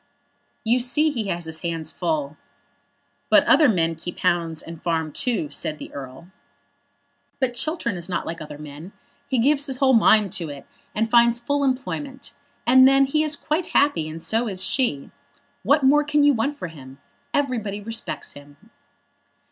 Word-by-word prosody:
"You 235 Hz, +3 st, +2 dB
see 275 Hz, +6 st, +2 dB
he 230 Hz, -7 st, -3 dB
has 175 Hz, -3 st, -3 dB
his 160 Hz, 0 st, -5 dB
hands 165 Hz, -2 st, -4 dB
full." 155 Hz, -4 st, -2 dB, 0.9 s
"But -, -, +6 dB
other 300 Hz, -4 st, +5 dB
men 165 Hz, -5 st, +1 dB
keep 170 Hz, +2 st, -8 dB
hounds 170 Hz, -3 st, 0 dB
and 165 Hz, -1 st, -10 dB
farm 160 Hz, -2 st, -1 dB
too," 225 Hz, -, -1 dB
said 150 Hz, +1 st, -3 dB
the -, -, -10 dB
Earl. 140 Hz, +5 st, -9 dB, 1.1 s
"But 260 Hz, -2 st, 0 dB
Chiltern 245 Hz, -, -2 dB
is 175 Hz, +1 st, -6 dB
not 175 Hz, -, -2 dB
like 165 Hz, 0 st, -6 dB
other 150 Hz, -1 st, -8 dB
men. 150 Hz, +5 st, -10 dB, 0.3 s
He 265 Hz, -, -1 dB
gives 280 Hz, +4 st, +3 dB
his 265 Hz, -2 st, -3 dB
whole 265 Hz, 0 st, +3 dB
mind 215 Hz, -4 st, +4 dB
to 170 Hz, -6 st, -3 dB
it, 140 Hz, -1 st, -9 dB, 0.3 s
and 220 Hz, +1 st, +1 dB
finds 235 Hz, +1 st, +4 dB
full 285 Hz, +4 st, -1 dB
employment. 265 Hz, 0 st, -3 dB, 0.3 s
And 260 Hz, +2 st, +7 dB
then 275 Hz, 0 st, +5 dB
he 305 Hz, +3 st, +1 dB
is 305 Hz, -1 st, +1 dB
quite 315 Hz, +4 st, -2 dB
happy, 280 Hz, -, +2 dB
and 160 Hz, +1 st, -7 dB
so 230 Hz, +2 st, 0 dB
is 190 Hz, -3 st, -1 dB
she. 190 Hz, -, -1 dB, 0.5 s
What 285 Hz, 0 st, +2 dB
more 290 Hz, +3 st, +5 dB
can 295 Hz, 0 st, +2 dB
you 290 Hz, 0 st, +5 dB
want 275 Hz, +5 st, -1 dB
for 180 Hz, -11 st, -6 dB
him? 135 Hz, -4 st, -13 dB, 0.3 s
Everybody 230 Hz, -8 st, -1 dB
respects 225 Hz, +3 st, -4 dB
him." 145 Hz, 0 st, -15 dB
220 Hz, 170 wpm, -23 LUFS, 165-270 Hz, 1.1 s, And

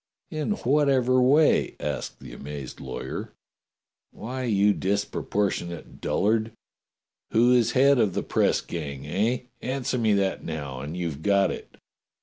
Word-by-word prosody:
"In 155 Hz, +5 st, -1 dB
whatever 130 Hz, -, +3 dB
way?" 145 Hz, +5 st, +4 dB
asked -, -, -4 dB
the -, -, -10 dB
amazed 70 Hz, -2 st, -7 dB
lawyer. 65 Hz, -2 st, -6 dB, 0.8 s
"\Miy, 125 Hz, +1 st, -3 dB
you 100 Hz, 0 st, +4 dB
disproportionate 100 Hz, -3 st, -2 dB
dullard! 110 Hz, +2 st, +1 dB, 0.8 s
^Mio 120 Hz, +3 st, +5 dB
is 120 Hz, -1 st, +3 dB
head 135 Hz, +1 st, +5 dB
of 100 Hz, -6 st, +2 dB
the -, -, -1 dB
press -, -, +2 dB
gang, 70 Hz, -5 st, -6 dB
eh.^ 110 Hz, +11 st, 0 dB, 0.2 s
Answer 130 Hz, 0 st, -2 dB
me 110 Hz, -2 st, +3 dB
that 100 Hz, -1 st, 0 dB
now, 70 Hz, -5 st, -5 dB
and 75 Hz, +6 st, -6 dB
you've 80 Hz, -5 st, -3 dB
got 100 Hz, +1 st, +3 dB
it." -, -, -8 dB
105 Hz, 135 wpm, -26 LUFS, 85-125 Hz, 0.8 s, ^Mio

